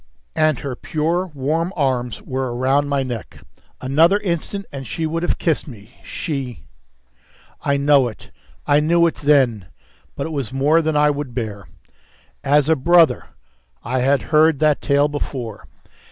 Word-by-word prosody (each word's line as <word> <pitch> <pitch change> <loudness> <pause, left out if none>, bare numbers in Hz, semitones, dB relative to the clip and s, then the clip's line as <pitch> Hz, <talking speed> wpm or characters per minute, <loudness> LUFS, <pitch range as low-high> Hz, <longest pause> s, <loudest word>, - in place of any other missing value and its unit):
And 155 -3 +2
her 135 -3 -4
pure, 165 +7 -1
warm 160 +3 -2
arms 125 - -1
were 130 -2 -3
round 135 +3 +1
my 140 -1 0
neck; 120 -8 -7 0.4
another 160 +9 +3
instant, 195 0 -3
and 135 -3 -7
she 160 +8 -3
would 165 +1 -2
have 175 - -1
kissed 160 -3 -1
me, 115 -2 -13
she! 130 - -5 1.0
I 140 0 +1
know 140 -2 +4
it. 110 - -11 0.3
I 145 0 +4
knew 170 +3 +3
it 165 - +1
then. 130 - +2 0.5
But - - -3
it 160 - -5
was 140 -8 -3
more 145 +5 +3
than 155 -1 0
I 150 0 +4
would 140 -4 -5
bear. 105 -5 -5 0.8
As 145 +1 +3
a 160 - +4
brother! 170 +3 +4 0.6
I 130 +3 -1
had 135 +2 +2
heard 155 0 +5
that 155 -1 +2
tale 140 +1 +2
before. 130 -6 -6
145 Hz, 155 wpm, -20 LUFS, 130-155 Hz, 1.0 s, heard